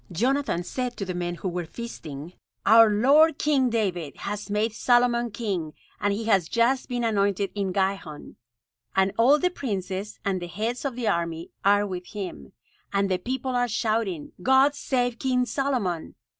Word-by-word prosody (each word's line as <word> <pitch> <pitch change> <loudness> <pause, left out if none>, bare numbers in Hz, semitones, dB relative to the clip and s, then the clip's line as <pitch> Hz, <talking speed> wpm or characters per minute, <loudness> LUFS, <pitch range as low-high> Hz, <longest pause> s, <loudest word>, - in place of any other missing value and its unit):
Jonathan 250 - 0
said 250 +5 -4
to 195 - -3
the 185 - -3
men 175 0 -3
who 185 - -5
were 180 0 -2
feasting: 165 -6 -8 0.3
"Our 225 0 +8
lord 285 +9 +5
King 280 -5 +2
David 185 -10 -2
has 205 +1 -4
made 210 +2 0
Solomon 240 0 +2
king, 190 -9 -3 0.3
and 205 - +1
he 215 +3 -2
has 195 -7 +2
just 245 +4 +1
been 245 -1 -2
anointed 200 -3 +1
in 200 -2 -2
Gihon; 190 -5 -3 0.6
and 190 0 +3
all 250 +7 +5
the 360 +4 +1
princes, 195 - -4
and 190 -2 0
the 175 - -5
heads 225 - -3
of 270 -3 -2
the 240 -2 -3
army, 170 -2 -1
are 205 +1 +4
with 180 -2 -6
him, 180 - -7 0.4
and 200 -1 +1
the 185 - +1
people 260 +5 -3
are 245 -1 +1
shouting, 215 -7 -1
'God 265 +5 +5
save 245 -4 -1
King 255 -2 +1
Solomon!' 245 - -2
210 Hz, 170 wpm, -25 LUFS, 185-245 Hz, 0.6 s, Our